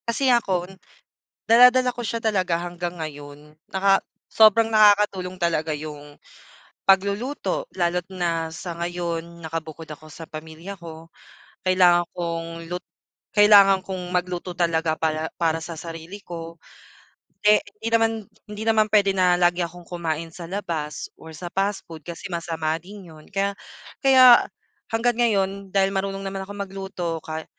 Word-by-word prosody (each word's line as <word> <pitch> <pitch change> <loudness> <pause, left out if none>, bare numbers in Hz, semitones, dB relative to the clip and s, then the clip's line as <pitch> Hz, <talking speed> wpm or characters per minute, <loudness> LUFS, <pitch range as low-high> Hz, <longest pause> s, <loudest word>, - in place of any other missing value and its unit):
Kasi 255 +2 +2
ako, 190 -7 +1 0.8
dala-dala 250 +2 +6
ko 240 - -7
siya 230 +2 -3
talaga 190 -6 +1
hanggang 175 0 -5
ngayon 145 -1 -9 0.2
naka 195 0 +4 0.3
sobrang 225 +1 +5
nakakatulong 205 -4 +4
talaga 165 -3 0
yung 150 -1 -9 0.7
pagluluto 200 - +1 0.2
lalo't 175 0 +1
na 165 -3 -2
sa 170 +1 -6
ngayon 170 -1 -4
nakabukod 160 -1 -6
ako 155 0 -11
sa 165 +1 -10
pamilya 160 +5 -8
ko, 165 -2 -11 0.6
kailangan 180 -2 +5
kong 170 -1 -3 0.3
lut 180 - -2 0.6
kailangan 200 -2 +7
kong 180 -2 -6
magluto 180 0 -2
talaga 165 -2 +1
pala 160 0 -1
para 165 -1 +2
sa 165 +2 -7
sarili 165 +4 -8
ko. 165 -1 -8 0.9
Eh 210 0 +6 0.2
hindi 230 - -2
naman, 225 0 +4 0.4
hindi 210 +1 -6
naman 220 -1 +4
puwede 200 -2 +4
na 180 -1 +4
lagi 175 0 +3
akong 175 +1 -11
kumain 165 -2 -3
sa 170 - -8
labas 165 -6 -4
or 160 - -12
sa 175 +3 -7
past 195 +1 0
food 160 -2 -9
kasi 170 +3 -8
masama 165 -2 -2
din 195 +2 -12
yun 155 -1 -15
kaya, 200 0 0 0.5
kaya 255 -3 +8 0.5
hangga't 235 +1 +1
ngayon 200 -4 0
dahil 195 0 +3
marunong 195 0 -2
naman 195 0 -4
akong 205 +1 -9
magluto 190 -4 -4
ka, 160 0 -5
180 Hz, 140 wpm, -23 LUFS, 165-200 Hz, 0.9 s, kaya